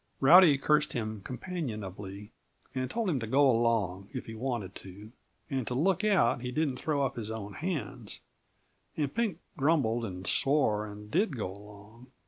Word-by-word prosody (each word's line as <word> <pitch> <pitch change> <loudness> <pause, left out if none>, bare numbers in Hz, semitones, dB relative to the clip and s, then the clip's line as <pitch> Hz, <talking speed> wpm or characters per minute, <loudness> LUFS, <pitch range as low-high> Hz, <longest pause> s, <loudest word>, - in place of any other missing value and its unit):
Rowdy 155 +1 +8
cursed 150 +2 +2
him 110 -4 -3
companionably 105 - -6 0.4
and 130 -1 -2
told 230 -2 -1
him 155 -7 +1
to 115 - -4
go 140 +5 +4
along, 110 -5 +1
if 130 - -5
he 115 - -8
wanted 110 -5 -3
to, 100 +3 -12 0.4
and 135 -6 -2
to 125 - -2
look 185 - +2
out 185 - +3
he 125 0 -4
didn't 145 -2 0
throw 145 -1 0
up 135 +1 -3
his 110 -2 -4
own 105 -2 -5
hands; 135 - -4 0.8
and 145 -3 -1
Pink 225 -8 0 0.2
grumbled 135 -6 +2
and 95 -4 -6
swore 110 -4 +2
and 105 0 -10
did 180 - +1
go 100 -4 -3
along. 105 +4 -14
125 Hz, 165 wpm, -30 LUFS, 105-150 Hz, 0.8 s, Rowdy